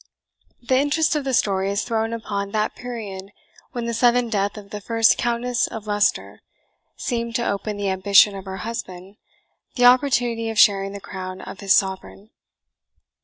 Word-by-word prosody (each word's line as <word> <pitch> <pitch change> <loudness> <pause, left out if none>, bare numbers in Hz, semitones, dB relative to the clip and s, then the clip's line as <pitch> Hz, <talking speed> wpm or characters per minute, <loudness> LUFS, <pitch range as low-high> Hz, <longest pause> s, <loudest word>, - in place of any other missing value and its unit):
The 255 +2 +2
interest 300 +3 +1
of 295 -2 -2
the 265 - -1
story 195 -2 +1
is 200 +1 -1
thrown 225 -1 -1
upon 205 -3 -4
that 215 0 0
period 205 -6 -7 0.4
when 240 -2 -4
the 235 - -2
sudden 240 +1 +2
death 205 -1 -1
of 200 -1 -11
the 210 - -6
first 225 +1 +3
Countess 240 +1 -1
of 220 -2 -8
Leicester 205 0 0 0.6
seemed 235 -2 -3
to 235 - 0
open 200 +1 -3
to 205 - -5
the 195 - 0
ambition 195 +2 +4
of 195 0 -8
her 190 0 -6
husband 195 -3 -7 0.6
the 245 - +3
opportunity 245 -3 +3
of 225 - -5
sharing 195 -1 +4
the 200 - -7
crown 185 -1 -7
of 200 - -9
his 195 -2 +3
sovereign. 195 +2 -2
215 Hz, 170 wpm, -22 LUFS, 200-235 Hz, 0.6 s, ambition